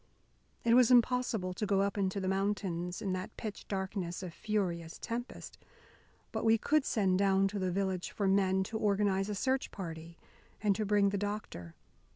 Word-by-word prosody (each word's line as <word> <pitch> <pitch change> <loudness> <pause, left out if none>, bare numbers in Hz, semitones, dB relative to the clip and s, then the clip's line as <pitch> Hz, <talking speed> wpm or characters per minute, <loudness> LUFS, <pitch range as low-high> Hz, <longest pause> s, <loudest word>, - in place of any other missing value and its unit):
It 230 - +4
was 245 -1 +6
impossible 240 -6 +3
to 210 - -2
go 195 -1 +3
up 200 0 0
into 195 -1 0
the 190 - -2
mountains 190 -3 -1
in 190 -2 -1
that 185 0 -5
pitch 215 -2 -6
darkness 190 -2 -3
of 175 -3 -6
furious 175 -6 -2
tempest. 240 +2 -6 0.7
But - - -3
we 225 0 +5
could 300 +5 +2
send 190 -5 +2
down 195 0 +3
to 205 0 -4
the 185 -1 0
village 190 -1 -1
for 200 - -1
men 190 -1 +3
to 220 +3 -4
organise 200 -1 +1
a 210 - -2
search 260 +6 0
party 165 -2 -7 0.4
and 205 -2 +2
to 215 0 -2
bring 205 -1 +4
the 200 0 -2
doctor. 205 - -5
195 Hz, 180 wpm, -32 LUFS, 185-210 Hz, 0.7 s, was